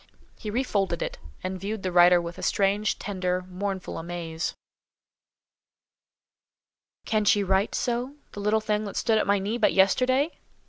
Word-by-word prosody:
He 215 - -7
re 240 +5 0
folded 195 -8 -1
it, - - -5 0.2
and 185 0 -3
viewed 210 +1 -4
the 185 - -1
writer 175 0 +7
with 170 0 -6
a - - -6
strange, 200 +1 +1
tender, 185 -2 -2
mournful 190 0 -4
amaze. 165 -1 -4 2.5
"Can 215 -1 +1
she 205 0 +4
write 190 +2 +1
so—the 245 0 -3
little 210 +2 +2
thing 210 0 0
that 200 - -6
stood 225 -2 +2
at - - 0
my 200 0 +4
knee 205 +5 -2
but 215 - +3
yesterday? 255 - +3
200 Hz, 150 wpm, -26 LUFS, 185-215 Hz, 2.5 s, writer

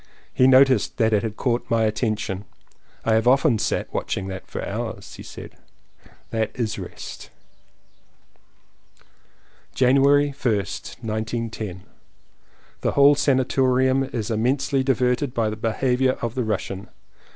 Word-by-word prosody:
He 130 - +4
noticed 130 -3 +4
that 110 -2 +2
it 105 - +3
had 110 -2 -5
caught 120 -2 -1
my 115 -1 +2
attention. 110 -3 -1 0.6
"I 115 - +3
have 110 +2 +2
often 135 -2 +4
sat - - -2
watching 95 - -3
that 95 -1 -7
for - - -5
hours," - - -5
he - - -10
said. - - -10 0.8
"That 110 -1 0
is 115 -3 -2
rest." - - -9 2.5
January 140 +3 +4
1st, 115 -8 -3
1910. 110 -3 -4 1.0
The - - 0
whole 140 +1 +6
sanatorium 130 -1 +2
is 115 -4 -4
immensely 135 +5 +1
di 135 0 +2
verted 125 +2 0
by 110 -2 +1
the - - -4
behaviour 125 +4 +1
of 115 -3 -4
the 125 -1 -1
Russian. 100 -2 -3
120 Hz, 130 wpm, -23 LUFS, 110-130 Hz, 2.5 s, whole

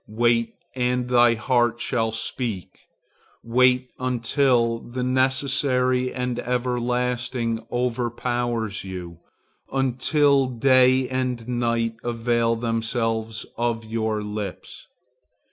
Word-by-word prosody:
Wait, 115 +1 +1 0.2
and 125 0 0
thy 120 -1 +5
heart 120 0 +1
shall 115 -2 0
speak. 110 -3 -4 0.6
Wait 125 +1 +3
until 125 -1 +1
the 125 +2 -5
necessary 130 0 +1
and 125 -1 -3
everlasting 125 -1 -1
overpowers 120 -2 -1
you, 90 -3 -7 0.5
until 135 +1 +2
day 130 +1 +4
and 125 -2 -2
night 115 -2 -1
avail 115 0 +1
themselves 115 -1 -2
of 115 -1 -1
your 110 -1 -2
lips. 105 -2 -6
120 Hz, 90 wpm, -24 LUFS, 115-125 Hz, 0.6 s, thy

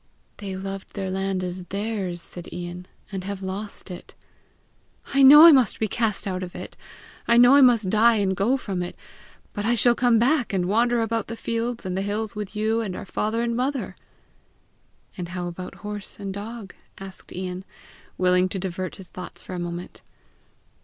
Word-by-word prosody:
"They 195 -2 -5
loved 195 0 -7
their 195 -2 -3
land 190 -1 -1
as 180 0 -5
theirs," 195 -3 -3
said 175 -1 -7
Ian, 175 +1 -7 0.2
"and 190 -2 -4
have 195 0 -5
lost 195 +1 -5
it!" 180 - -10 1.0
"I 275 - +4
know 295 +4 +11
I 335 - +11
must 260 -8 +3
be 220 - +1
cast 220 -1 0
out 185 -2 -2
of 180 -1 -7
it! - - -8 0.5
I 235 - +5
know 245 +2 +8
I 285 - +7
must 230 -7 +5
die 230 +2 +5
and 195 -3 +1
go 230 +9 +2
from 195 -8 -4
it; 175 - -5 0.6
but 205 - -3
I 235 +3 +2
shall 240 +2 +4
come 240 -1 +3
back 245 0 +2
and 185 -2 +1
wander 235 +5 +2
about 225 0 -2
the 230 - -5
fields 230 0 -3
and 185 -1 -2
the 190 - -1
hills 210 +2 -3
with 210 0 -6
you 220 +2 +1
and 195 -5 -4
our - - -6
father 215 +4 -1
and 235 0 -1
mother!" 265 +2 -2 1.2
"And 180 -3 -5
how 175 0 -4
about 175 +1 -7
horse 210 -1 -6
and 195 -1 -4
dog?" 205 0 -7 0.2
asked 195 -1 -5
Ian, 185 0 -5 0.5
willing 180 0 +3
to 195 - -3
divert 185 -1 -4
his 190 -2 -9
thoughts 180 -1 -9
for - - -9
a 180 - -4
moment. 175 +1 -6
200 Hz, 190 wpm, -24 LUFS, 185-230 Hz, 1.2 s, know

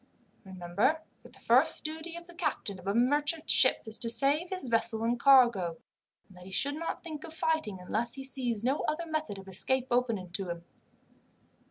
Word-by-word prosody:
Remember 190 - -1 0.2
that - - -17
the - - -16
first - - +2
duty 320 +2 -6
of 340 - -10
the 350 - -13
captain 300 - -3
of 180 - -12
a 200 - +1
merchant 290 +6 +1
ship - - +4
is 220 0 -6
to 230 - +4
save 280 +9 +3
his 375 -1 -4
vessel 230 -2 +1
and 235 +1 0
cargo, 235 - +4 0.5
and 190 - -19
that 180 0 -13
he - - -11
should 280 +9 +1
not 330 +2 -5
think 310 -3 -7
of 320 -1 -9
fighting 315 -13 -1
unless 225 +6 -2
he 270 - -7
sees 245 -5 -1
no 265 +4 +1
other 310 +3 -2
method 310 -9 -3
of 195 0 -11
escape 250 +7 +1
open 230 -7 0
to 190 0 -4
him. 170 0 -6
245 Hz, 195 wpm, -30 LUFS, 200-310 Hz, 0.5 s, ship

